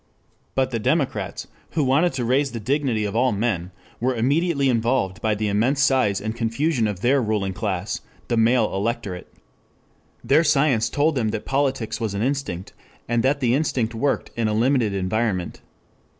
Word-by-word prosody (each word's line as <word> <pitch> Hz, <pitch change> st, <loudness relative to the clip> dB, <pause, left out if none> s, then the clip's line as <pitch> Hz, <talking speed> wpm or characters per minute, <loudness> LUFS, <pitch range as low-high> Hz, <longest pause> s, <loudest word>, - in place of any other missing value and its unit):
But 130 Hz, -1 st, +1 dB
the 115 Hz, -, -1 dB
democrats, 135 Hz, +5 st, -1 dB, 0.3 s
who 155 Hz, -, +1 dB
wanted 140 Hz, +7 st, +3 dB
to 125 Hz, -2 st, -2 dB
raise 135 Hz, +2 st, +1 dB
the 115 Hz, -, -4 dB
dignity 125 Hz, -2 st, 0 dB
of 100 Hz, +1 st, -4 dB
all 125 Hz, +2 st, +3 dB
men, 100 Hz, -5 st, -1 dB, 0.3 s
were 125 Hz, +2 st, 0 dB
immediately 140 Hz, +4 st, +1 dB
involved 115 Hz, -5 st, 0 dB
by 110 Hz, -1 st, +1 dB
the 105 Hz, +1 st, -1 dB
immense 115 Hz, +8 st, +1 dB
size 130 Hz, -8 st, +2 dB
and 110 Hz, +2 st, -4 dB
confusion 115 Hz, +2 st, 0 dB
of 100 Hz, -3 st, -4 dB
their 135 Hz, +3 st, +3 dB
ruling 105 Hz, -4 st, -1 dB
class 100 Hz, -1 st, -3 dB, 0.3 s
the 120 Hz, -, 0 dB
male 115 Hz, 0 st, +3 dB
electorate. 100 Hz, -2 st, -3 dB, 0.9 s
Their 150 Hz, +4 st, +4 dB
science 135 Hz, -7 st, +2 dB
told 150 Hz, +5 st, +2 dB
them 120 Hz, -6 st, 0 dB
that 110 Hz, 0 st, -4 dB
politics 135 Hz, -5 st, -1 dB
was 110 Hz, -3 st, -2 dB
an 100 Hz, -, -1 dB
instinct, 130 Hz, -9 st, -3 dB, 0.3 s
and 120 Hz, 0 st, +1 dB
that 140 Hz, +3 st, +1 dB
the 120 Hz, -2 st, +2 dB
instinct 130 Hz, -5 st, 0 dB
worked 135 Hz, +5 st, -1 dB
in 115 Hz, -1 st, 0 dB
a 105 Hz, -, 0 dB
limited 120 Hz, -1 st, +2 dB
environment. 95 Hz, -1 st, -1 dB
120 Hz, 170 wpm, -23 LUFS, 110-135 Hz, 0.9 s, Their